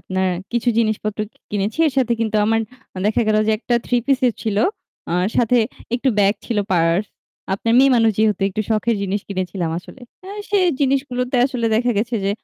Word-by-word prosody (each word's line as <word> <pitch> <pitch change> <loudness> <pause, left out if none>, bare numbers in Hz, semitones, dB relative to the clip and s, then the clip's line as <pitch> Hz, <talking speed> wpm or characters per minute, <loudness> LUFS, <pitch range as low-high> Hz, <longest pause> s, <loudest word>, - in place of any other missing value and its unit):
আপনার 190 0 -1 0.2
কিছু 240 +1 0
জিনিসপত্র 215 -1 -1
কি - - -32
কিনেছি 205 +5 -2
এর 295 - 0
সাথে 250 -3 +2
কিন্তু 220 -1 0
আমার 225 +1 +2 0.5
দেখা 220 +2 +2
গেল 215 - +3
যে 220 - +3
একটা 240 +1 -1
3 245 -1 +1
পিসও 260 -2 +3
ছিল। 215 -2 -1 0.6
আর 180 +1 +1
সাথে 245 +1 +3 0.4
একটু 250 +2 0
ব্যাগ 200 +1 +4
ছিল 230 -3 -1
পার্স। 170 +3 +2 0.5
আপনার 230 +4 -1
মেয়ে 275 +1 +6
মানুষ 225 -1 +4
যেহেতু 210 -3 +2
একটু 200 +2 -3
শখের 220 +1 +1
জিনিস 200 +1 -1
কিনেছিলাম 185 -3 -3
আসলে। 260 - -13 0.2
অ্যা 380 +1 -9 0.2
সেই 395 -3 +3
জিনিসগুলোতে 260 -2 0
আসলে 250 -4 -2
দেখা 245 +1 +1
গেছে 235 +3 -1
যে 195 - +1
225 Hz, 185 wpm, -20 LUFS, 200-250 Hz, 0.6 s, মেয়ে